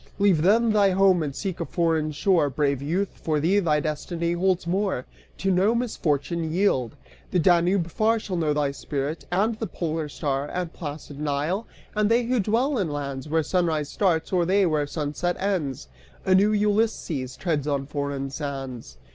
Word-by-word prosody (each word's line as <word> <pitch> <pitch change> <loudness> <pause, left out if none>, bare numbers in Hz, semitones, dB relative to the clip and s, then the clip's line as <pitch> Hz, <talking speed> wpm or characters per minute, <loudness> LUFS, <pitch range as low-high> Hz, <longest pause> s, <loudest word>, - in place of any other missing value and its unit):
Leave 200 -6 +3
then 220 +6 +4
thy 205 -2 +5
home 190 -2 +4
and 145 -3 -3
seek 190 -4 -4
a - - 0
foreign 160 -3 0
shore 165 0 +2
Brave 140 -1 0
youth; 180 +8 -2
for 155 -2 0
thee 180 +7 +3
thy 155 -6 +2
destiny 165 +3 -2
holds 180 0 +1
more: 190 -6 -1 0.3
To 195 - 0
no 195 +5 +3
misfortune 170 - -1
yield! 160 - +1 0.3
The - - 0
Danube 175 +1 +3
far 220 +6 +2
Shall 205 -4 -4
know 160 -3 +1
thy 145 -1 +1
spirit, 140 +2 -4
and 215 +5 +1
the 220 - -2
polar 160 -2 -3
star, 140 -1 -2
And 180 -2 -3
placid 145 -2 -7
Nile, 150 +8 -1 0.3
and 210 0 +2
they 235 +2 +3
who 245 +1 +1
dwell 235 +6 +1
in 185 -5 0
lands 140 -1 -4
Where 160 +1 +2
sunrise 160 -4 0
starts, 175 -3 0
or 180 -2 +3
they 190 +3 +3
where 155 -4 +1
sunset 155 +4 -2
ends! 180 -9 -2 0.4
A 190 - +4
new 200 +3 +5
Ulysses 205 - 0
treads 155 -5 -1
on 140 -2 0
foreign 140 -1 -3
sands." 135 - -6
170 Hz, 175 wpm, -25 LUFS, 145-195 Hz, 0.4 s, thy